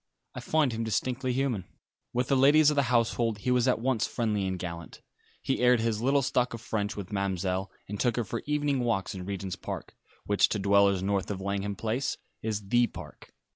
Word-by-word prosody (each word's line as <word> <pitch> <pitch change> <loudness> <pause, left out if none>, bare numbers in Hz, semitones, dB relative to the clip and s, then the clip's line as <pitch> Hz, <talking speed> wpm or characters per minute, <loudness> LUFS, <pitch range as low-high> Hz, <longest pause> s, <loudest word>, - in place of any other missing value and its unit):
"I - - -6
find 155 -4 +1
him 115 0 -3
distinctly 125 +3 -1
human." 125 -6 0 0.5
With 125 0 0
the 140 - +4
ladies 145 +3 +6
of - - -1
the 140 - +4
household 115 -2 +1
he 125 +5 -1
was 125 0 +3
at 125 - +3
once 120 -1 0
friendly 105 -5 -1
and 95 0 -2
gallant. 85 -1 -7 0.4
He 135 - 0
aired 125 -1 +5
his 110 -1 0
little 135 +3 +3
stock 125 -1 0
of 115 - -10
French 105 -3 -2
with 100 -2 -6
Ma'mselle, 95 -1 -1 0.2
and 105 0 -5
took 120 -3 +2
her 120 - 0
for 115 +2 -4
evening 145 -2 +1
walks 115 -6 0
in 95 -2 -6
Regent's 95 -1 -4
Park, - - -7 0.3
which 100 0 +3
to - - -1
dwellers 100 -1 +3
north 100 0 0
of 100 -2 -3
Langham 100 +1 -2
Place 115 +6 -2 0.2
is 105 -3 -3
"the 120 +1 +4
Park." 80 -8 -11
110 Hz, 205 wpm, -28 LUFS, 100-125 Hz, 0.5 s, ladies